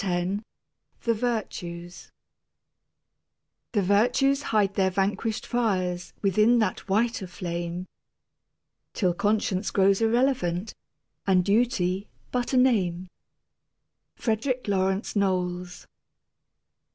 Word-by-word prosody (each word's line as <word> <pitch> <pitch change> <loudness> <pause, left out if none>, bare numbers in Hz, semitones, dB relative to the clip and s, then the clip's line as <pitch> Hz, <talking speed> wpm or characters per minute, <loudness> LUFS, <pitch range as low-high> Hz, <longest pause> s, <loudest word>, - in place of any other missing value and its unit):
X 185 +2 -1 0.6
THE 230 - +2
VIRTUES 180 -7 -4 1.6
The 205 -3 +2
virtues 245 +8 +3
hide 210 -7 +1
their 190 -1 +2
vanquished 200 +4 -1
fires 185 -7 -1
Within 215 +5 +4
that 215 -2 -1
whiter 215 -1 +1
flame 175 0 -4 1.1
Till 180 -4 +2
conscience 205 +1 0
grows 195 +1 +3
irrelevant 225 -6 +1 0.5
And 185 -2 +4
duty 200 -3 +1 0.2
but 245 -1 -1
a 260 - +2
name. 185 -8 +2 1.1
FREDERICK 245 +2 -1
LAWRENCE 195 +1 0
KNOWLES. 180 -2 -1
200 Hz, 90 wpm, -26 LUFS, 180-225 Hz, 1.6 s, Within